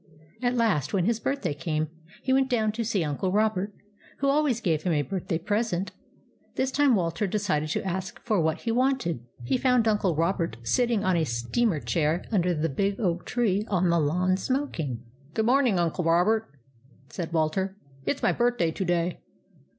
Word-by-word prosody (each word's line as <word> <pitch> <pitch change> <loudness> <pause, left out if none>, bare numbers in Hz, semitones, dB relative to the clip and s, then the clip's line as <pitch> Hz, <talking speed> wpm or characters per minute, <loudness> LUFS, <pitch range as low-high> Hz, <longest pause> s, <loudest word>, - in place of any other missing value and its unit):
At 245 0 +1
last 215 - +1
when 180 -3 +2
his 230 +1 +1
birthday 275 - -1
came, 155 +1 -2 0.4
he 260 - +1
went 265 0 +3
down 220 -4 +2
to 230 +2 -3
see 210 -5 0
Uncle 150 +5 -1
Robert, 210 -1 +1 0.5
who 275 - +1
always 280 -4 +2
gave 165 -8 0
him 175 -1 0
a 145 -1 +2
birthday 165 +2 -2
present. 200 +1 -1 0.6
This 265 0 0
time 280 -3 +4
Walter 180 +3 0
decided 180 -7 0
to - - -2
ask 190 0 -3
for 215 -6 +2
what 160 0 0
he 230 - -1
wanted. 250 - +1 0.2
He 130 - 0
found 250 -3 +3
Uncle 205 -6 +2
Robert 165 0 0
sitting 235 - +1
on 185 -2 +2
a 165 - +2
steamer 150 - 0
chair 160 +2 0
under 180 -4 +2
the 155 +1 0
big 195 +7 -1
oak 175 -5 -1
tree 210 -5 +1
on 185 -3 +2
the 170 - +3
lawn, 180 +5 +1
smoking. 255 - -2
u 115 - -6 0.4
Good 220 - +1
morning, 250 -4 +3
Uncle 170 0 0
Robert," 185 +7 +3 0.6
said 170 -3 -5
Walter. 170 +5 0
" 135 0 -25
It 285 - +1
's - - -20
my - - +4
birthday 240 -9 +1
to 190 - -3
day." 175 -1 0
190 Hz, 190 wpm, -27 LUFS, 165-230 Hz, 0.6 s, time